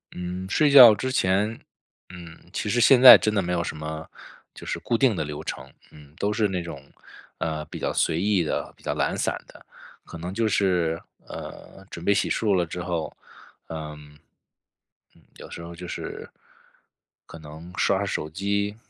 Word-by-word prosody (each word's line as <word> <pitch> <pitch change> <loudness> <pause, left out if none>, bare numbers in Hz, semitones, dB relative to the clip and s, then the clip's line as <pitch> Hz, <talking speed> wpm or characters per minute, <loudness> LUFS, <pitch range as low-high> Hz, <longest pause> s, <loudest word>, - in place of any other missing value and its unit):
嗯， 90 +1 -5
睡 150 +8 +3
觉 125 -6 +10
之 130 +6 -3
前 105 -1 0 0.5
嗯， 85 -2 -12
其 105 - -3
实 120 +3 +1
现 130 0 +6
在 130 - +12
真 110 - -1
的 100 - +1
没 90 -1 -3
有 85 - 0
什 80 - -5
么 80 +1 -6 0.5
就 - - -12
是 - - -3
固 115 - -1
定 120 -4 +3
的 80 - -2
流 75 0 -7
程， - - -7 0.2
嗯。 75 -1 -17
都 105 +1 -1
是 105 0 +1
那 95 -2 -3
种， 85 -5 -9 0.5
呃， 80 -2 -3
比 - - -9
较 - - -2
随 80 - +1
意 100 -4 +2
的、 - - -3
比 - - -24
较 - - -2
懒 - - -1
散 - - -1
的， - - -17 0.4
可 85 - -10
能 90 +3 -6
就 115 +2 0
是， 90 -5 0 0.3
呃， 95 - -10
准 85 - -8
备 100 - +3
洗 - - 0
漱 105 -3 +1
了 90 -2 +1
之 90 +2 -6
后 85 -2 -4 0.5
嗯 75 -2 -9 1.0
嗯， - - -23 0.2
有 - - -11
时 - - -8
候 85 0 -9
就 90 +1 -9
是 - - -7 1.0
可 85 - -12
能 80 +3 -11
刷 95 - +2
刷 100 - -1
手 80 -5 -3
机， 100 +4 -2
90 Hz, 205 characters per minute, -24 LUFS, 80-100 Hz, 1.0 s, 在